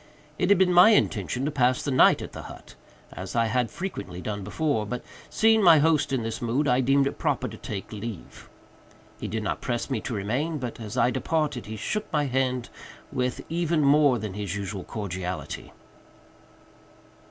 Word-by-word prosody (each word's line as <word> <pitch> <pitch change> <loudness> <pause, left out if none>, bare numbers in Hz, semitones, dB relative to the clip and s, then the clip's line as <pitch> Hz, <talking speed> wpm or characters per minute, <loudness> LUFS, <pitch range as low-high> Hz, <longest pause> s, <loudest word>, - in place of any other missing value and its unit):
It 180 - +1
had 200 - +6
been 185 -1 +3
my 180 +4 +8
intention 125 - +1
to 150 - -1
pass 130 -3 +2
the 140 - -2
night 130 - +5
at - - -8
the - - -8
hut, - - -12 0.4
as - - -7
I 115 -1 +3
had 115 +1 0
frequently 105 - -6
done 100 +2 -4
before, 110 +3 -1
but, 125 +3 -4 0.3
seeing 220 0 +4
my 170 -5 +8
host 155 -2 +2
in 130 -4 0
this 115 0 -4
mood, 125 +5 0
I 125 0 +3
deemed 135 +2 +3
it 140 - -3
proper - - 0
to - - -8
take 100 0 -6
leave. 105 -3 -8 0.7
He - - -4
did 110 +2 -3
not 105 - -2
press 120 +2 -3
me 120 -5 -1
to 120 - -4
remain, 130 +11 -1
but, 125 -4 -5
as 110 -2 -6
I 120 +2 +3
departed, 150 -3 -1
he 110 - -5
shook 210 - -3
my 150 -3 +1
hand 130 -2 -1 0.4
with 125 0 -2
even 165 -1 0
more 140 -2 +5
than 105 -3 -5
his 100 -2 -4
usual 100 -1 -4
cordiality. 95 -4 -5
125 Hz, 185 wpm, -26 LUFS, 110-150 Hz, 0.7 s, my